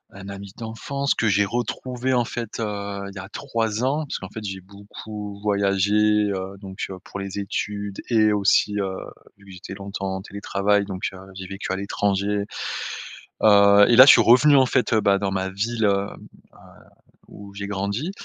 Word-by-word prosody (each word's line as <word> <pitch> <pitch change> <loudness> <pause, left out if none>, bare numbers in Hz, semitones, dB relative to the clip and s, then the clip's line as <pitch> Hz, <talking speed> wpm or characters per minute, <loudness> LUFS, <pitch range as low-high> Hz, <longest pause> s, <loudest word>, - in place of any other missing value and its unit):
Un 100 0 -9
ami 100 -1 -8
d'enfance 120 +5 -3
que 110 - 0
j'ai 100 0 +3
retrouvé 125 +4 -2
en 120 -1 +3
fait, 115 -1 -6
heu, 100 -2 -4
il 100 - -12
y - - -6
a 95 - -8
3 115 -3 -2
ans 145 +4 0
parce - - -5
qu'en 95 - -8
fait 110 +1 -8
j'ai 95 -1 -5
beaucoup 100 +1 -9
voyagé, 100 -1 +1 0.4
heu, 95 0 -4
donc 95 -1 -6
heu, 95 - -7
pour 100 - -8
les 100 +1 -5
études 100 0 -4
et 110 -3 +4
aussi, 105 0 +2
heu, 95 -1 -2 0.4
vu 100 - -20
que - - -12
j'étais 90 +1 -9
longtemps 95 -1 -5
en 95 - -5
télétravail, 100 0 0
donc 95 -2 -4
heu, - - -10 0.2
j'ai 95 -1 -7
vécu 95 -1 -5
à - - 0
l'étranger, 100 +1 -1 1.0
heu 100 -1 +7
et 120 - +5
là 130 - +11
je - - +10
suis - - +6
revenu 130 +5 +6
en 130 - +5
fait, 125 -3 0
heu, 110 - +4
bah, 100 -1 +3
dans 100 -1 -2
ma 95 0 -1
ville, 110 +4 -2
hem, 100 -1 -1 0.2
à - - -20 0.7
où 100 -1 -11
j'ai 100 0 -5
grandi 100 - -3
100 Hz, 195 wpm, -23 LUFS, 100-110 Hz, 1.0 s, là